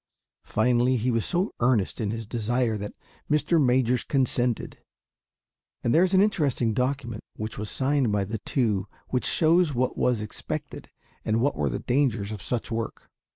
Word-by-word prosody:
Finally, 125 Hz, +3 st, +2 dB
he 125 Hz, +3 st, 0 dB
was 115 Hz, -2 st, 0 dB
so 180 Hz, +4 st, 0 dB
earnest 120 Hz, -4 st, +1 dB
in 105 Hz, -, -1 dB
his 115 Hz, +1 st, -4 dB
desire, 120 Hz, +1 st, 0 dB
that 105 Hz, 0 st, -6 dB, 0.3 s
Mr. 150 Hz, +1 st, +3 dB
Majors 125 Hz, -1 st, +2 dB
consented; 125 Hz, -3 st, 0 dB, 1.0 s
and 120 Hz, -, +2 dB
there 165 Hz, -, +6 dB
is 185 Hz, +1 st, +2 dB
an 190 Hz, -, +6 dB
interesting 145 Hz, -, +1 dB
document 125 Hz, -2 st, -2 dB
which 110 Hz, -1 st, -5 dB
was 105 Hz, 0 st, -4 dB
signed 135 Hz, -3 st, +1 dB
by 100 Hz, -1 st, +1 dB
the 110 Hz, +3 st, -4 dB
two 105 Hz, -6 st, 0 dB, 0.2 s
which 125 Hz, -, 0 dB
shows 165 Hz, -2 st, +3 dB
what 125 Hz, +1 st, 0 dB
was 125 Hz, -3 st, +2 dB
expected 105 Hz, -1 st, -6 dB, 0.3 s
and 110 Hz, +1 st, +1 dB
what 140 Hz, +5 st, +1 dB
were 75 Hz, -2 st, 0 dB
the -, -, -2 dB
dangers 120 Hz, -6 st, 0 dB
of 105 Hz, -3 st, -6 dB
such 115 Hz, +8 st, -3 dB
work. 115 Hz, 0 st, -4 dB
120 Hz, 165 wpm, -26 LUFS, 110-135 Hz, 1.0 s, there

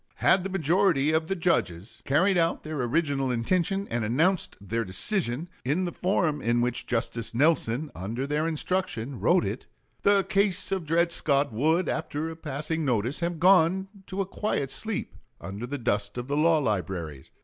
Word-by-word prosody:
Had 185 Hz, -, +3 dB
the 195 Hz, -, -3 dB
majority 170 Hz, -4 st, +2 dB
of 160 Hz, 0 st, +1 dB
the 195 Hz, -, -1 dB
judges 120 Hz, -, -1 dB
carried 185 Hz, +8 st, +3 dB
out 165 Hz, -1 st, +1 dB
their 155 Hz, -3 st, -4 dB
original 135 Hz, +1 st, 0 dB
intention, 180 Hz, -, 0 dB
and 120 Hz, -1 st, -1 dB
announced 160 Hz, -, +1 dB
their 115 Hz, +4 st, -2 dB
decision 125 Hz, -, -1 dB, 0.2 s
in 150 Hz, +9 st, 0 dB
the 175 Hz, -, -3 dB
form 170 Hz, -6 st, 0 dB
in 120 Hz, +1 st, +1 dB
which 120 Hz, 0 st, -1 dB
Justice 115 Hz, -1 st, -1 dB
Nelson, 145 Hz, -1 st, +2 dB
under 110 Hz, +9 st, -4 dB
their 150 Hz, +3 st, 0 dB
instruction, 150 Hz, -7 st, -2 dB
wrote -, -, +3 dB
it, -, -, -5 dB, 0.3 s
the 200 Hz, -1 st, +4 dB
case 200 Hz, -1 st, +1 dB
of 190 Hz, -5 st, -2 dB
Dred 170 Hz, +2 st, +2 dB
Scott 140 Hz, -5 st, +1 dB
would, 160 Hz, +9 st, +2 dB
after 155 Hz, +3 st, -3 dB
a -, -, -8 dB
passing 160 Hz, +1 st, -3 dB
notice, 125 Hz, -1 st, 0 dB
have 170 Hz, -1 st, -2 dB
gone 185 Hz, +1 st, +4 dB, 0.2 s
to 195 Hz, +1 st, -2 dB
a -, -, -1 dB
quiet 185 Hz, -8 st, -2 dB
sleep 220 Hz, 0 st, -2 dB, 0.3 s
under 100 Hz, +5 st, -6 dB
the 145 Hz, +3 st, -4 dB
dust 105 Hz, -4 st, -1 dB
of 120 Hz, 0 st, -4 dB
the 145 Hz, -, -1 dB
law 160 Hz, +2 st, +4 dB
libraries. 90 Hz, -, -3 dB
150 Hz, 170 wpm, -27 LUFS, 120-180 Hz, 0.3 s, the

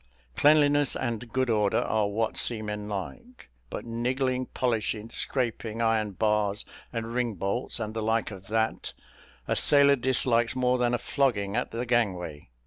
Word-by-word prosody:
Cleanliness 145 Hz, -1 st, +4 dB
and 120 Hz, -2 st, -4 dB
good 130 Hz, -1 st, 0 dB
order 105 Hz, -2 st, +2 dB
are 110 Hz, -2 st, +1 dB
what 110 Hz, +2 st, -1 dB
seamen 105 Hz, -2 st, -1 dB
like; 235 Hz, -, -7 dB, 0.2 s
but -, -, -6 dB
niggling, 125 Hz, +2 st, -1 dB
polishing, 115 Hz, -2 st, -2 dB
scraping 115 Hz, -3 st, -1 dB
iron 110 Hz, -3 st, +1 dB
bars, 105 Hz, +1 st, 0 dB, 0.3 s
and 115 Hz, -1 st, -4 dB
ring 120 Hz, -3 st, -1 dB
bolts, 100 Hz, +8 st, -2 dB
and 110 Hz, -1 st, -4 dB
the 110 Hz, -, -3 dB
like 110 Hz, +1 st, 0 dB
of 95 Hz, -1 st, -10 dB
that, 110 Hz, +1 st, -1 dB, 0.5 s
a -, -, +1 dB
sailor 140 Hz, -1 st, +5 dB
dislikes 120 Hz, -2 st, +2 dB
more 125 Hz, 0 st, +1 dB
than 120 Hz, 0 st, +2 dB
a -, -, 0 dB
flogging 110 Hz, -8 st, 0 dB
at 125 Hz, -, -1 dB
the 120 Hz, +2 st, -4 dB
gangway. 90 Hz, -, -1 dB
115 Hz, 150 wpm, -27 LUFS, 105-125 Hz, 0.5 s, sailor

